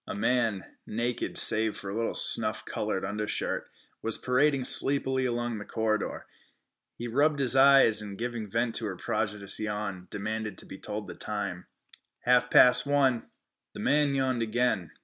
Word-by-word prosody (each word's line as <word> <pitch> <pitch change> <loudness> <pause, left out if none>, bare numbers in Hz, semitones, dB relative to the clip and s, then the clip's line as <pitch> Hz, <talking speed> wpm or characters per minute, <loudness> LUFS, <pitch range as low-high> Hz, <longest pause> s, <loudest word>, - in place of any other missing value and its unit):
A - - -5
man, 115 -3 0 0.2
naked 120 +2 -3
save 110 -1 +6
for 100 - -7
a - - -6
little 115 0 -2
snuff - - +2
colored - - -3
undershirt, 105 +1 -3 0.3
was 115 0 +1
parading 135 +1 +1
sleepily 130 -1 +1
along 120 -2 -3
the - - -7
corridor. 110 -1 -3 0.7
He 120 - -6
rubbed 145 +5 +1
his 135 -2 +4
eyes, 135 -5 +5
and, 100 -2 -8
giving 115 -2 -5
vent 115 +2 -1
to 110 - -4
a 95 - -5
prodigious 105 -1 -3
yawn, 105 -3 -5
demanded 105 0 -5
to - - -10
be 95 - -11
told 105 0 -6
the - - -8
time. 100 -4 -5 0.5
"Half 125 0 +2
past 125 +2 +5
one." 135 -4 +1 0.5
The - - -8
man 145 -1 +1
yawned 130 -3 -1
again. 110 -6 -1
115 Hz, 160 wpm, -27 LUFS, 105-125 Hz, 0.7 s, save